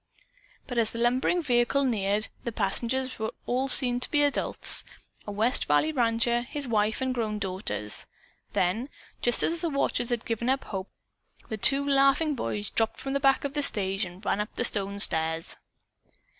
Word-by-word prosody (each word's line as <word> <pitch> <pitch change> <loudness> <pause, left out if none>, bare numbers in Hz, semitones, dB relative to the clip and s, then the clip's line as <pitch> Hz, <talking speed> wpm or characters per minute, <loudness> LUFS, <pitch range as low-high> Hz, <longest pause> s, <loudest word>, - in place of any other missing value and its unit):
But 245 -2 -3
as 225 -1 +1
the - - -9
lumbering 255 +9 0
vehicle 245 +1 +1
neared, 210 -4 0 0.2
the 235 - -4
passengers 235 +5 -1
were 220 0 -3 0.4
seen 250 -2 +6
to - - -2
be 295 -2 +2
all 290 - +4
adults - - +3 0.4
a - - -5
west 220 +5 +1
valley 150 - +1
rancher, 235 -2 0
his 280 +2 -3
wife 220 0 -1
and 260 -1 -1
grown 220 -4 -3
daughters. 185 - -1 0.5
Then, 210 +9 -1 0.3
just 240 -1 +2
as 335 0 0
the 340 - -1
watchers 275 -4 -1
had 240 -2 -3
given 235 +2 -3
up 270 +1 0
hope, 190 -1 -7 0.6
the 220 - -4
two 275 +6 +4
laughing 275 +3 +2
boys 210 -6 -4
dropped 225 0 -1
from 270 - -5
the 280 - 0
back 270 -1 +2
of 280 -1 -4
the 295 - -2
stage 195 -6 +1
and 185 +3 -9
ran 205 - -1
up 210 - -6
the 245 - 0
stone 200 -2 +3
stairs. 160 -3 +3
235 Hz, 180 wpm, -26 LUFS, 205-270 Hz, 0.6 s, seen